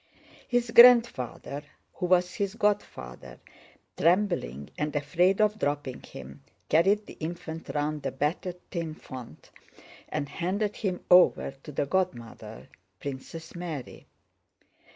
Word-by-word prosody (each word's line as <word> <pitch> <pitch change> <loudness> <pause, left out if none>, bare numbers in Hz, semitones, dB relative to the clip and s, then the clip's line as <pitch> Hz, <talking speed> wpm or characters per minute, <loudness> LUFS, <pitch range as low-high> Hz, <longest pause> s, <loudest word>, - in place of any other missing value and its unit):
His 245 -1 0
grandfather, 235 - +6 0.3
who 180 - -3
was 180 0 +3
his 200 0 -2
godfather, 200 - -2 0.6
trembling 165 - +1
and 150 +1 -3
afraid 175 +7 +2
of 215 0 +2
dropping 145 -3 -2
him, 70 +2 -11 0.3
carried 195 +6 +3
the - - -12
infant 165 0 -6
round 150 0 -1
the - - -2
battered 155 +6 -2
tin 165 -3 -3
font 125 - -11 0.6
and 150 -2 -2
handed 195 +7 -2
him 185 -4 -3
over 180 -5 +6
to 150 - -9
the 145 - -1
godmother, 120 - -3 0.3
Princess 145 +4 -7
Mary. 170 -7 -7
165 Hz, 115 wpm, -28 LUFS, 140-190 Hz, 0.6 s, grandfather